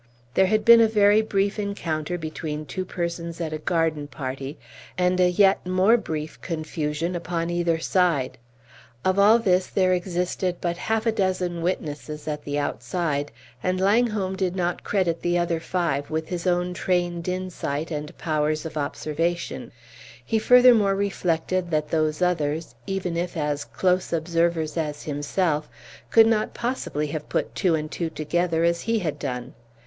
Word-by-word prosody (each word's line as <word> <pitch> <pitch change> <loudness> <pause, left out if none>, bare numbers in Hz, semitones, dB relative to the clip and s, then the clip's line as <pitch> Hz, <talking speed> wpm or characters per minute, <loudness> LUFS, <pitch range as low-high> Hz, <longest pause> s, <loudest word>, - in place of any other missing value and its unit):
There 190 +6 +4
had 215 +2 +1
been 235 0 +9
a 225 - +6
very 210 0 +5
brief 200 -1 0
encounter 175 -5 -2
between 155 -2 -5
two 185 +7 -4
persons 170 -1 -4
at 160 -2 -3
a 155 - -3
garden 160 -2 0
party, 135 0 -5 0.4
and 180 0 +2
a 180 0 +5
yet 195 +2 +4
more 185 +5 +4
brief 155 -8 -4
confusion 155 0 -3
upon 170 0 -2
either 170 -1 +1
side. 165 -7 +1 0.7
Of 185 +1 +2
all 210 +3 +7
this 185 -5 +2
there 185 -1 +2
existed 180 0 -1
but 170 -1 -1
half 220 +4 -1
a 225 - +3
dozen 185 -4 -1
witnesses, 150 -3 -3
at 150 -1 -4
the 145 0 -2
outside, 145 +2 -2 0.3
and 185 +3 0
Langholm 205 -1 +2
did 185 -1 -1
not 175 -1 -1
credit 180 -5 0
the 175 0 +1
other 175 -1 0
five 160 -5 -1
with 160 0 -3
his 180 -1 -3
own 180 0 +1
trained 175 -1 -1
insight 180 -4 -3
and 150 0 -5
powers 155 -1 -1
of 160 -1 -6
observation; 160 +4 -2 0.5
he 225 - +1
furthermore 235 -4 +6
reflected 185 -2 -1
that 155 -2 0
those 155 +1 +1
others, 160 -5 0
even 185 -3 -2
if 175 +1 -2
as 145 -1 -1
close 180 +2 0
observers 165 -1 0
as 150 -2 -3
himself, 150 +1 -1 0.4
could 225 -1 +7
not 220 -1 +1
possibly 235 - -2
have 150 0 -5
put - - -1
two 180 -5 +2
and 155 0 -4
two 170 -2 -2
together 165 +2 0
as 170 0 +2
he 230 0 0
had 155 -7 -2
done. 125 -3 -4
175 Hz, 160 wpm, -24 LUFS, 155-185 Hz, 0.7 s, been